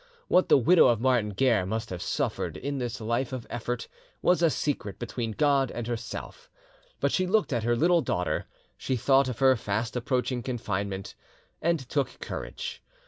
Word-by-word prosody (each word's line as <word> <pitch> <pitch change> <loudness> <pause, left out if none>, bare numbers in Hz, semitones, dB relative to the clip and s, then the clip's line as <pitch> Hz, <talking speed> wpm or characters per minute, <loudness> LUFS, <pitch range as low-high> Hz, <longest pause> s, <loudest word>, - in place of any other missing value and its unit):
What 185 - +3
the - - +7
widow 165 +6 +6
of 120 -3 +3
Martin 125 -4 +2
Guerre 115 -1 +2
must 110 +4 -3
have 90 -1 -5
suffered - - -2
in 140 0 -3
this 120 -2 -3
life 120 +4 -1
of 130 -3 -5
effort 120 0 -3 0.4
was 180 -1 +4
a 165 - +5
secret 140 -10 -2
between 115 -2 -4
God 140 -1 +2
and 120 - -5
herself, 120 0 -6 0.5
but 140 - +1
she 185 - +1
looked 190 -7 +2
at 120 - +1
her 120 0 +3
little 170 +7 +4
daughter, - - -1 0.3
she 130 - -1
thought 135 +2 +3
of 125 - -4
her 130 0 +5
fast 110 +1 -2
approaching 125 0 -1
confinement, 100 -6 -3 0.5
and 170 0 +2
took 135 -1 -1
courage. - - -6
125 Hz, 175 wpm, -28 LUFS, 115-140 Hz, 0.5 s, the